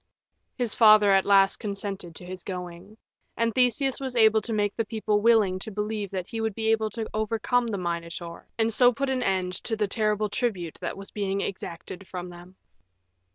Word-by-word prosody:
His 240 -4 0
father 215 -2 +7
at 195 -1 +4
last 195 -1 +4
consented 200 -5 -5
to 180 - -7
his 185 0 -7
going. 180 +2 -7 0.4
And 230 -1 +1
Theseus 255 +2 +2
was 260 -2 -4
able 220 -1 +5
to 230 - -3
make 205 -2 0
the 225 - 0
people 215 -1 -1
willing 210 -5 +4
to 205 - -6
believe 210 0 -3
that 185 -2 -4
he 225 +3 -5
would 220 -2 -2
be 220 -1 +1
able 220 -1 +1
to 220 0 -5
overcome 225 +3 0
the 210 -3 -2
Minotaur, 170 -1 -5
and 225 0 +1
so 245 +2 +6
put 270 +3 -2
an 260 -1 0
end 185 -5 0
to 225 - +1
the 210 -1 0
terrible 215 0 0
tribute 200 -6 -3
that - - -4
was 195 0 -10
being 200 -1 -2
exacted 185 0 -6
from 180 -1 -6
them. 175 +2 -13
210 Hz, 195 wpm, -26 LUFS, 190-225 Hz, 0.4 s, father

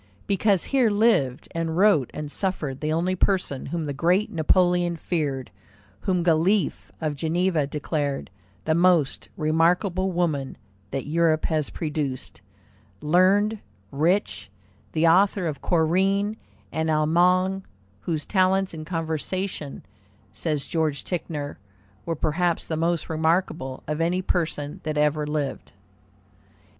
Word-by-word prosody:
Because 200 -1 +2
here 255 -4 +4
lived 205 - +2
and 165 0 -2
wrote 185 - +4
and 150 -1 -6
suffered 150 -9 -2
the 155 0 -1
only 170 +4 +1
person 180 -8 0
whom 165 -2 -3
the 145 - -3
great 180 +8 +1
Napoleon 175 +1 +2
feared, 150 -6 -2 0.5
whom 180 - 0
Galiffe, 175 +2 +1
of 155 -2 -2
Geneva, 165 0 0
declared 145 - -3 0.3
"the 160 - +2
most 170 -4 +2
remarkable 175 +4 +2
woman 155 -7 -1 0.3
that 135 - -3
Europe 160 0 +2
has 155 -3 0
produced"; 150 -5 -4 0.6
learned, 195 - +3 0.3
rich, 170 - 0 0.4
the 160 +1 +3
author 190 +2 +4
of 155 -4 -3
Corinne 190 +5 +2 0.4
and 160 +1 -1
Allemagne, 180 +5 +3 0.4
whose 155 - -3
"talents 190 -1 +2
in 155 -1 -7
conversation," 165 -1 -3 0.5
says 150 -4 -2
George 155 -3 -1
Ticknor, 150 -5 -4 0.5
"were 165 - 0
perhaps 165 +3 0
the 160 - -3
most 165 0 0
remarkable 160 -4 -1
of 150 +2 -2
any 180 +3 +1
person 155 -5 -2
that 155 -1 -3
ever 150 0 +1
lived." 150 -2 -3
165 Hz, 120 wpm, -25 LUFS, 150-185 Hz, 0.6 s, here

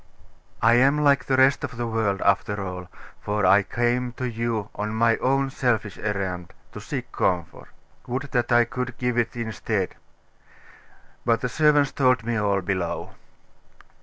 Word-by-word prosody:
'I 115 +1 +6
am 135 +5 +4
like 140 -1 +3
the 130 - +1
rest 130 +1 +4
of 125 - -5
the 120 - -2
world, 110 -4 -1
after 105 +1 +1
all; 90 -1 -6 0.3
for 105 -1 -1
I 100 +3 +6
came 120 +3 -1
to 125 +1 -4
you 115 -3 -2
on 105 +1 -4
my 115 0 +3
own 135 +1 +1
selfish 115 -6 -1
errand, 95 -4 -3 0.2
to - - -9
seek - - -5
comfort. 90 -3 -2 0.4
Would 130 +3 -2
that 120 -1 0
I 120 0 +5
could 125 +1 -5
give 125 -1 -1
it 115 0 -1
instead! 110 -4 -2 1.3
But 115 -1 +1
the 125 - -1
servants 150 0 +3
told 125 -4 +2
me 120 0 -1
all, 100 -3 +1
below. 90 -3 -3
115 Hz, 160 wpm, -24 LUFS, 100-125 Hz, 1.3 s, I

